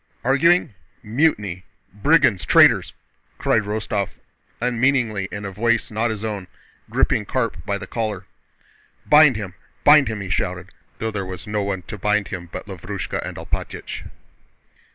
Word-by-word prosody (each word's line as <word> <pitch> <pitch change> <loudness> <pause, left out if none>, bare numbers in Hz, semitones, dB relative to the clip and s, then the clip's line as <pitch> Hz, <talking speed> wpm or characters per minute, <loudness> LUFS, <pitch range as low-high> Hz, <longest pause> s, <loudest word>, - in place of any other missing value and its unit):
"Arguing? 145 +2 +3 0.3
Mutiny!... 105 - 0 0.3
Brigands! 135 - +3
Traitors!" - - +5 0.5
cried 110 - +2
Rostóv 105 -2 -3 0.4
unmeaningly 120 -4 +1
in 100 0 -5
a 100 - -4
voice 115 +4 0
not 110 +2 0
his 110 -1 -4
own, 100 -4 -4 0.4
gripping 105 - +1
Karp 115 -6 -2
by 100 - 0
the 100 - -7
collar. 105 -2 -3 0.8
"Bind 150 -3 +7
him, 100 -4 -5 0.3
bind 150 -2 +7
him!" 110 -2 -3
he 95 -3 -5
shouted, - - -2 0.3
though 110 0 -2
there 100 -2 -3
was 95 +1 -7
no 105 -1 -1
one 100 -2 -3
to 105 +2 -8
bind 105 0 +1
him 85 -3 -6
but - - -6
Lavrúshka - - -5
and - - -6
Alpátych. - - -5
105 Hz, 145 wpm, -22 LUFS, 100-120 Hz, 0.8 s, Bind